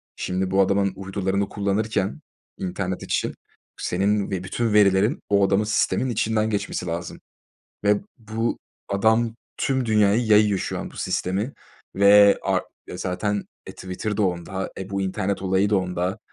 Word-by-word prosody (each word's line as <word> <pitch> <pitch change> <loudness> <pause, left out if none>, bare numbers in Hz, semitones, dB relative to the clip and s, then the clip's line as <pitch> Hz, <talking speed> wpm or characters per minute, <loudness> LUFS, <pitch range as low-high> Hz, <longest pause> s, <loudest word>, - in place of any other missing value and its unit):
şimdi 95 0 -2
bu 95 +1 +4
adamın 100 0 +2
uydularını 95 0 -2
kullanırken 100 0 -1 0.4
internet 95 0 -3
için - - -1 0.5
senin 100 +2 0
ve 95 -2 -2
bütün 110 +4 -1
verilerin 105 - +4
o 100 -1 +4
adamın 100 +2 +2
sisteminin 110 +4 +1
içinden 110 -1 0
geçmesi 100 -3 -2
lazım 85 0 -4 0.7
ve 105 0 +3 0.2
bu 115 0 -2 0.3
adam 110 +3 +2 0.2
tüm 130 -2 0
dünyaya 105 -2 +4
yayıyor 105 -3 +4
şu - - -3
an - - -6
bu - - -15
sistemi 100 +8 -1 0.4
ve 100 +1 +7
ar - - +1 0.3
zaten, 100 +3 -2 0.2
e, - - -7
Twitter 95 +3 -4
da 110 - +1
onda, 95 +1 -2
e, 95 +1 -6
bu 100 0 -1
internet 95 +1 -2
olayı 95 +2 +2
da 105 - +4
onda, 90 +1 -1
100 Hz, 145 wpm, -24 LUFS, 95-105 Hz, 0.7 s, ve